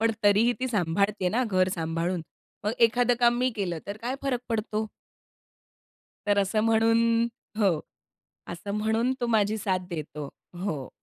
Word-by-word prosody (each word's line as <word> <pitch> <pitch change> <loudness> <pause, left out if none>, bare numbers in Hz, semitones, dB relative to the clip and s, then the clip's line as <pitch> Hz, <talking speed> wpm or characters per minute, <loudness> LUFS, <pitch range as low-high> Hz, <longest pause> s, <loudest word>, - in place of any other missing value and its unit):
पण 225 0 +3
तरीही 210 +4 +5
ती 260 - 0
सांभाळते 200 -1 +1
ना 240 +7 +1
घर 185 -1 +3
सांभाळून. 165 +2 -1 0.4
मग 210 - +1
एखादं 245 +1 +4
काम 240 0 +5
मी 255 +1 +2
केलं 175 -5 -2
तर 200 +1 -5
काय 245 +3 -1
फरक 260 -3 0
पडतो?" 220 -1 -1 1.4
तर 205 0 +3
असं 200 +2 +1
म्हणून 225 0 +4 0.6
हो, 185 -7 +3 0.7
असं 185 +4 -6
म्हणून 220 +4 +1
तो 240 - +1
माझी 215 -2 +2
साथ 190 -3 0
देतो. 150 -3 -5 0.4
हो. 150 -9 -3
210 Hz, 145 wpm, -27 LUFS, 185-230 Hz, 1.4 s, तरीही